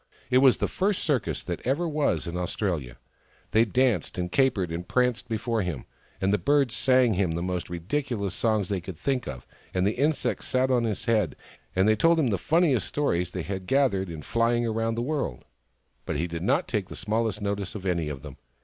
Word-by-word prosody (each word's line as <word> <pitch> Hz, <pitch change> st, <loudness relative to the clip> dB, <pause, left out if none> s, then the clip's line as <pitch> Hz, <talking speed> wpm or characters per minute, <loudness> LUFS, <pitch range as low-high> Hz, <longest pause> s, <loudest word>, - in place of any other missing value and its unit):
It 125 Hz, -, +6 dB
was 130 Hz, -2 st, +6 dB
the -, -, 0 dB
first 195 Hz, +1 st, 0 dB
circus 135 Hz, -9 st, 0 dB
that 85 Hz, -2 st, -4 dB
ever 145 Hz, +8 st, 0 dB
was 145 Hz, -, 0 dB
in 85 Hz, 0 st, -5 dB
Australia. 85 Hz, -, -2 dB, 0.5 s
They 110 Hz, +1 st, +5 dB
danced 120 Hz, -6 st, +1 dB
and 90 Hz, 0 st, -2 dB
capered 115 Hz, -11 st, +2 dB
and 85 Hz, +2 st, -4 dB
pranced 125 Hz, -1 st, +1 dB
before 115 Hz, 0 st, -1 dB
him, 85 Hz, -9 st, -4 dB, 0.3 s
and 95 Hz, 0 st, +1 dB
the 105 Hz, -, +2 dB
birds 135 Hz, +4 st, +2 dB
sang 125 Hz, -1 st, +4 dB
him 90 Hz, -3 st, +1 dB
the 85 Hz, +1 st, -2 dB
most 90 Hz, -1 st, -2 dB
ridicu 115 Hz, -, -2 dB
lous 100 Hz, -2 st, -2 dB
songs 110 Hz, -3 st, +1 dB
they 95 Hz, -2 st, -2 dB
could 85 Hz, -1 st, -8 dB
think 130 Hz, -, -1 dB
of, 65 Hz, -1 st, -7 dB, 0.3 s
and 90 Hz, 0 st, +2 dB
the 100 Hz, -, +3 dB
insects 145 Hz, +4 st, 0 dB
sat 130 Hz, +1 st, +2 dB
on 120 Hz, -2 st, +3 dB
his 110 Hz, -4 st, -2 dB
head 110 Hz, -8 st, +1 dB, 0.4 s
and 95 Hz, +2 st, +3 dB
told 165 Hz, 0 st, +4 dB
him 130 Hz, -7 st, +2 dB
the 100 Hz, -, 0 dB
funniest 160 Hz, -, +2 dB
stories 90 Hz, -, 0 dB
they 90 Hz, -1 st, -4 dB
had 95 Hz, 0 st, -5 dB
gathered 120 Hz, -9 st, +2 dB
in 80 Hz, -2 st, -7 dB
flying 115 Hz, 0 st, +1 dB
round 115 Hz, 0 st, -1 dB
the 120 Hz, -, 0 dB
world: 135 Hz, -, -3 dB, 0.6 s
but -, -, -1 dB
he 80 Hz, +4 st, 0 dB
did 85 Hz, -1 st, -5 dB
not 135 Hz, -, +1 dB
take 105 Hz, -5 st, -2 dB
the -, -, -7 dB
smallest 110 Hz, -1 st, -1 dB
notice 100 Hz, -1 st, -3 dB
of 100 Hz, -2 st, -6 dB
any 85 Hz, -4 st, 0 dB
of 70 Hz, -2 st, -7 dB
them. 75 Hz, -3 st, -9 dB
105 Hz, 210 wpm, -27 LUFS, 90-130 Hz, 0.6 s, It